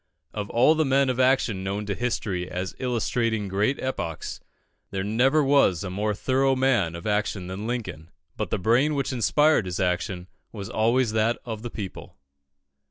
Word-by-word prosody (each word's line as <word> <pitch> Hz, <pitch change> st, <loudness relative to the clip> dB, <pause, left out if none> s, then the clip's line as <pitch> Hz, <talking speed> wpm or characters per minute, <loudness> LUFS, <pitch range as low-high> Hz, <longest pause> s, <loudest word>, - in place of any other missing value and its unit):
Of 105 Hz, -1 st, -4 dB
all 125 Hz, +6 st, +5 dB
the 160 Hz, 0 st, +2 dB
men 135 Hz, -1 st, +3 dB
of 125 Hz, -, -4 dB
action 125 Hz, -7 st, +2 dB
known 100 Hz, +2 st, -3 dB
to 100 Hz, -, -2 dB
history 100 Hz, -6 st, -2 dB
as 90 Hz, +1 st, -4 dB
illustrating 115 Hz, -3 st, -1 dB
great 100 Hz, +8 st, 0 dB
epochs, 85 Hz, -11 st, -4 dB, 0.5 s
there 95 Hz, -1 st, -3 dB
never 130 Hz, +9 st, +3 dB
was 135 Hz, -, +3 dB
a 95 Hz, -, -4 dB
more 105 Hz, +2 st, -1 dB
thorough 135 Hz, +4 st, +2 dB
man 120 Hz, -11 st, +2 dB
of 85 Hz, -, -8 dB
action 105 Hz, -3 st, -1 dB
than 95 Hz, +4 st, -5 dB
Lincoln, 90 Hz, -10 st, -4 dB, 0.3 s
but -, -, -3 dB
the -, -, 0 dB
brain 125 Hz, +10 st, +2 dB
which 140 Hz, -1 st, -1 dB
inspired 130 Hz, 0 st, +3 dB
his 90 Hz, -, -4 dB
action 90 Hz, 0 st, -1 dB, 0.2 s
was 100 Hz, -1 st, -7 dB
always 115 Hz, +2 st, +2 dB
that 110 Hz, +2 st, +1 dB
of 110 Hz, -3 st, -5 dB
the 120 Hz, -, -5 dB
people. 100 Hz, -, -8 dB
110 Hz, 170 wpm, -25 LUFS, 95-130 Hz, 0.5 s, all